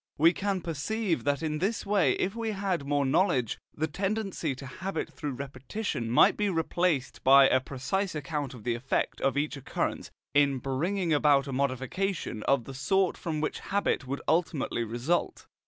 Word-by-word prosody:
We 165 +4 +6
can 200 -1 -1
perceive 170 +4 -2
that 145 +1 +1
in 155 -1 -1
this 205 +7 -1
way, 200 -3 +3
if 195 +3 -1
we 225 -2 -2
had 190 -7 -2
more 145 -1 +1
knowledge, 130 - +2
the 155 - -1
tendency 195 -3 -2
to 135 - -9
habit 185 +9 -4
through 145 -3 -4
repetition 135 - -4
might 120 - +6
be 210 -1 0
replaced 165 -4 0
by 135 +1 +8
a 130 - +4
precise 155 +9 -2
account 145 -2 -3
of 115 - -12
the 120 - 0
effect 120 +3 -1
of 135 +1 +1
each 145 0 -1
occurrence 135 - -3 0.2
in 140 -1 +4
bringing 165 +7 -1
about 145 -2 +4
a 135 - -5
modification 135 - -2
of 135 -3 +3
the 135 - -9
sort 185 +8 +1
from 155 -3 -3
which 155 - -2
habit 200 -9 -1
would 140 +2 -4
ultimately 160 -7 +1
result. 120 +10 -1
150 Hz, 170 wpm, -29 LUFS, 135-190 Hz, 0.2 s, by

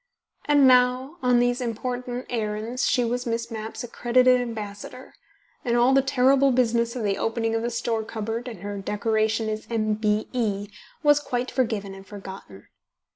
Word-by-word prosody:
And 290 -2 +5
now, 255 +4 +3
on 250 -1 +3
these 245 +1 +2
important 245 +1 -4
errands 225 +2 -2
she 245 - +2
was 245 +1 -2
Miss 230 0 -2
Mapp's 220 +2 -6
accredited 250 +1 +3
ambassador, 225 +1 -7 0.5
and 240 -2 +1
all 245 +2 +4
the 270 - +5
terrible 270 +1 +3
business 235 -1 +1
of 245 - -3
the 200 -1 0
opening 225 0 -1
of 225 - 0
the 235 - -1
store 230 -1 -1
cupboard 225 +2 -4
and 225 -8 -8
her 205 0 -4
decoration 220 +2 0
as 215 0 -4
M.B.E. 215 -1 -1 0.3
was 295 -1 +5
quite 250 -3 -3
forgiven 220 -6 -1
and 195 0 -12
forgotten. 190 - -10
235 Hz, 155 wpm, -25 LUFS, 215-250 Hz, 0.5 s, And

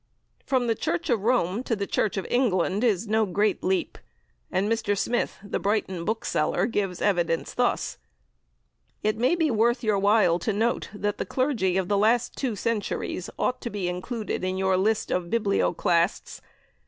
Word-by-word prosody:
From 260 -2 +2
the 230 - +2
Church 175 -3 -2
of 230 -4 +2
Rome 220 -3 +1
to 245 -3 -1
the 200 -1 -2
Church 210 0 0
of 195 - -2
England 205 -4 +1
is 220 -3 +1
no 220 0 +2
great 205 +8 0
leap, 365 -1 -1 0.5
and 190 +2 +1
Mr. 220 -2 0
Smith, 240 +5 -1
the 205 - -3
Brighton 195 -4 -1
bookseller, 215 -8 0
gives 200 -6 -2
evidence 175 -4 0
thus: 245 0 0 1.0
"It 215 0 +1
may 255 +8 +3
be 325 -4 +1
worth 235 +2 +2
your 210 -3 +2
while 200 -4 +4
to 220 - -1
note 225 +4 0
that 205 0 -3
the - - -1
clergy 235 -9 0
of 190 -2 0
the 200 0 +2
last 230 +3 +2
two 250 -6 -2
centuries 205 -4 -2
ought 255 - -1
to 235 - -4
be 205 -5 -3
included 195 +4 -3
in 185 0 -1
your 190 0 +2
list 210 +4 +1
(of 180 -1 0
Biblioclasts). 195 -4 +1
210 Hz, 170 wpm, -26 LUFS, 190-235 Hz, 1.0 s, while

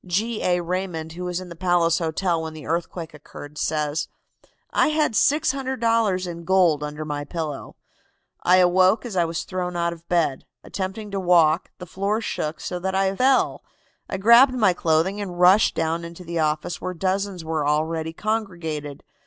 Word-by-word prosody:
'" - - -21
G. 225 +1 -2
A. 180 -1 +1
Raymond, 175 -2 -3
who 180 +2 -6
was 180 0 -2
in 185 -1 -9
the 170 - -9
Palace 175 -1 +2
Hotel 165 +1 -1
when 160 -1 -6
the 155 - -9
earthquake 165 0 -3
occurred, 150 0 -11
says: 150 0 -1 0.6
"I - - +3
had 305 -2 +1
$600 230 - +1
in 170 -1 -7
gold 175 -4 +3
under 150 +1 -5
my 145 -1 -3
pillow. 150 -2 -5 0.7
I 180 +1 +5
awoke 185 +5 +4
as 225 -5 -6
I 175 -2 +3
was 165 +2 -3
thrown 180 -1 -4
out 170 0 0
of 170 0 -16
bed. 165 -6 0 0.2
Attempting 200 +2 -5
to 195 - -2
walk, 170 -2 +3
the 180 - -8
floor 200 +5 -1
shook 155 -8 -3
so 180 - -4
that 190 +1 -2
I 195 0 +1
fell. 260 +4 +2 0.5
I - - -2
grabbed 235 +6 +6
my 210 -7 +3
clothing 170 +4 +1
and 180 -3 -6
rushed 185 +4 +5
down 165 +1 -1
into 170 +2 -9
the 170 -1 -3
office, 155 +2 -1
where 185 - -4
dozens 190 -1 -2
were 160 -2 -1
already 160 +2 0
congregated. 170 -8 -4
175 Hz, 180 wpm, -23 LUFS, 160-195 Hz, 0.7 s, grabbed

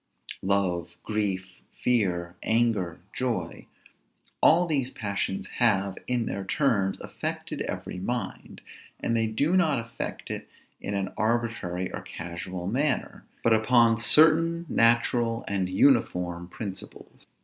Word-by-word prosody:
Love, 90 -3 0
grief, 95 -3 -3
fear, 90 -8 0
anger, 110 -8 0
joy, 125 -2 -3 0.7
all 175 +3 +6
these 140 -6 0
passions 100 -4 -3
have, 100 -5 +3
in 125 -2 0
their 100 - -3
turns, 100 -4 +1
affected - - -4
every 90 - -5
mind; 115 +1 -4 0.4
and 115 - -1
they 115 -1 +2
do 140 +11 +1
not 160 -7 +3
affect 115 0 -5
it - - -6 0.3
in 100 - -3
an 95 -1 -2
arbitrary 110 -6 -1
or - - -4
casual 90 +1 -6
manner, 130 +8 -1 0.2
but 115 - +4
upon 115 +1 +4
certain, 160 +8 +5
natural, 115 -1 +2
and 95 -2 -1
uniform 90 -6 +2
principles. 95 0 -9
110 Hz, 115 wpm, -27 LUFS, 95-120 Hz, 0.7 s, all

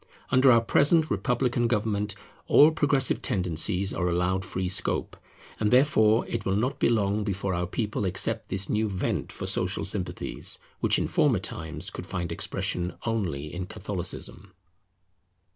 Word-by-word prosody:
Under 130 +1 +6
our 115 -1 +5
present 155 +7 +3
republican 125 -1 0
government 105 -2 -1 0.3
all 150 +2 +7
progressive 140 -4 +2
tendencies 90 +2 +1
are 90 -1 -1
allowed 90 +2 0
free 95 0 -3
scope, 95 - 0 0.4
and 105 - +1
therefore 115 -4 +4
it 115 - -3
will 95 - 0
not 130 +7 -1
be - - +3
long 105 -2 +1
before 100 -2 -2
our 90 0 -1
people 105 +2 -2
accept 95 - -1
this 95 0 -2
new 110 0 0
vent 95 -1 -2
for - - -6
social - - -2
sympathies, - - -3 0.2
which - - +2
in - - -1
former - - +2
times 80 +4 -3
could 90 - -8
find 85 -3 -4
expression 90 0 -3
only 85 -11 -2
in 90 0 -5
Catholicism. 95 -2 -5
100 Hz, 150 wpm, -27 LUFS, 90-115 Hz, 0.4 s, all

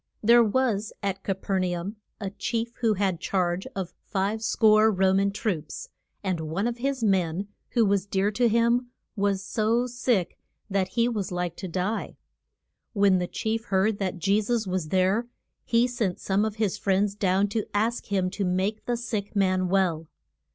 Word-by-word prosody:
THERE 235 +2 +7
was 220 -2 0
at 195 -1 -2
Ca 195 - -1
per 190 0 -1
na 180 -1 -1
um 195 +6 -5 0.2
a 195 -3 -4
chief 230 +3 -3
who 225 -3 +2
had 190 -3 0
charge 180 -1 -1
of 190 -3 -4
five 200 +3 -1
score 220 -1 +4
Ro 190 -2 +3
man 195 +1 +3
troops. 200 - -4 0.3
And 185 -4 -1
one 190 +7 -1
of 240 0 -2
his 270 -1 -1
men, 190 -1 +1 0.2
who 235 -3 +4
was 200 -1 +1
dear 195 +1 +1
to 240 +3 +2
him, 235 +2 +2 0.3
was 200 -2 0
so 225 +4 +1
sick 245 -7 -1 0.3
that 190 -1 +1
he 235 0 +4
was 210 -6 -2
like 175 -1 -2
to 190 - -5
die. 185 +5 -2 0.8
When 200 -3 +4
the 180 - -1
chief 225 +4 -2
heard 200 +2 +1
that 190 -1 -2
Je 200 +4 +2
sus 225 +1 0
was 185 -4 -2
there 190 +6 +2 0.4
he 235 +1 +3
sent 235 -7 -2
some 200 +2 +1
of 215 -1 -3
his 215 -4 -1
friends 200 +1 +1
down 195 0 +2
to 215 +1 -1
ask 225 +3 0
him 190 -2 0
to 200 +1 -3
make 190 +4 -1
the 240 -1 0
sick 215 -3 -4
man 185 -2 +2
well. 175 -4 +1
200 Hz, 180 wpm, -26 LUFS, 190-225 Hz, 0.8 s, THERE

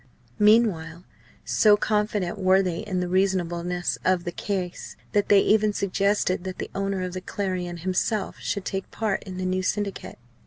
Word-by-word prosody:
Meanwhile 195 -7 +3 0.4
so 210 -1 +5
confident 210 -4 -1
were 190 0 +4
they 175 -3 -2
in 195 -4 -2
the 180 - -1
reasonableness 180 -2 0
of 185 -1 +2
the 175 - -3
case 185 -2 -4 0.2
that 205 -1 +1
they 200 -1 +7
even 215 0 +3
suggested 200 -2 0
that 185 -1 -5
the - - -6
owner 195 -1 -2
of 180 -1 -4
the 185 - -4
Clarion 180 -3 -3
himself 190 +4 -1
should 200 -2 -3
take 195 0 -4
part 215 -3 -1
in 185 -2 -7
the 185 - -3
new 185 0 0
Syndicate. 200 +1 -3
190 Hz, 165 wpm, -25 LUFS, 180-205 Hz, 0.4 s, they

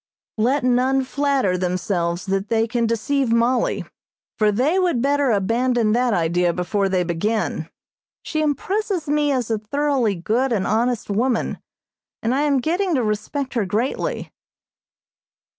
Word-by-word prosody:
Let 255 +5 +2
none 255 +2 +2
flatter 265 -9 0
themselves 175 -1 -1
that 195 +1 -2
they 225 0 +2
can 235 0 0
deceive 235 +3 0
Mollie, 235 +1 +1 0.5
for 215 -1 +4
they 275 - +1
would 355 -9 +1
better 280 +1 +2
abandon 230 +2 +1
that 245 +2 +2
idea 175 -1 +1
before 195 +3 -1
they 185 -1 +1
begin. 205 +6 -2 0.5
She 310 - -2
impresses 360 +3 -1
me 295 0 +2
as 250 -4 -1
a 220 - 0
thoroughly 260 -1 0
good 230 +9 0
and 205 -5 0
honest 230 0 0
woman, 235 +3 0 0.6
and 230 +2 +1
I 275 - +1
am 285 -3 +2
getting 350 +4 0
to 255 - +1
respect 225 +6 -2
her 230 -5 0
greatly. 250 - -2
235 Hz, 140 wpm, -21 LUFS, 205-280 Hz, 0.6 s, for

